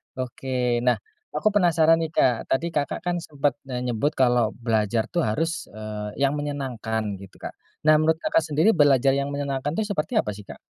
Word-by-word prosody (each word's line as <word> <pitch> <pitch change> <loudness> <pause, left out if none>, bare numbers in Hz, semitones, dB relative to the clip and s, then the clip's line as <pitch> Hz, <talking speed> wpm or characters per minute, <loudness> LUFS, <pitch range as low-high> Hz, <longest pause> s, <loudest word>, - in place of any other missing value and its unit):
Oke, 125 -1 -1
nah 120 - +5 0.4
aku 155 - +1
penasaran 165 -4 +4
nih 160 -1 -2
Kak 125 -3 +2
tadi 165 +5 0
Kakak 145 -3 -1
kan 175 -1 -1
sempet 145 -2 -2
menyebut 125 +2 -1
kalau 120 -4 +2
belajar 110 -2 0
tuh 175 - 0
harus, 165 +9 -1
eee, 105 -1 -7
yang 135 - +3
menyenangkan 125 -6 -3 0.2
gitu 95 -1 -13
Kak, - - -4 0.3
nah 155 0 +6
menurut 160 +1 +3
Kakak - - +3
sendiri 155 +9 +3
belajar 140 - +4
yang 140 - -1
menyenangkan 140 +1 -2
itu 220 - 0
seperti 155 -5 -2
apa 105 - +2
sih 100 0 -11
Kak? - - -10
135 Hz, 180 wpm, -24 LUFS, 120-155 Hz, 0.4 s, nah